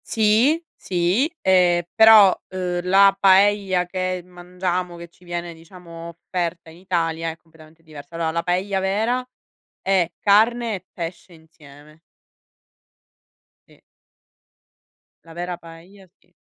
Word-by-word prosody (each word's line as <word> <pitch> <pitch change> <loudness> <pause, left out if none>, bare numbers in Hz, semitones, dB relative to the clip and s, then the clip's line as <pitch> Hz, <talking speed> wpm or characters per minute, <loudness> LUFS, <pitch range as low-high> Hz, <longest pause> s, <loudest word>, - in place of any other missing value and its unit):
Sì, 225 +9 +2
sì, 185 - 0
ehm, 180 -2 +3
però, 220 -3 +7
uhm, 180 -1 -3
la 195 +1 +5
paella 195 -1 +3
che 185 0 -3
mangiamo, 180 0 -5
che 170 0 -10
ci 175 - -26
viene 175 -1 -6
diciamo 165 0 -12
offerta 170 0 -5
in 165 - -16
Italia, 165 -3 -2
è 160 - -8
completamente 160 -1 -21
diversa. 155 0 -13
Allora, 165 -1 -2
la 170 +1 -2
paella 190 +2 -1
vera 220 +7 -1 0.5
è 185 -3 +1
carne 225 +2 +2
e 185 -1 -10
pesce 175 +1 -8
insieme. 155 -2 -18 1.7
Sì. - - -23 1.4
La 165 - -14
vera 175 +1 -5
paella 175 +4 -16
sì. - - -35
180 Hz, 120 wpm, -21 LUFS, 165-195 Hz, 1.7 s, però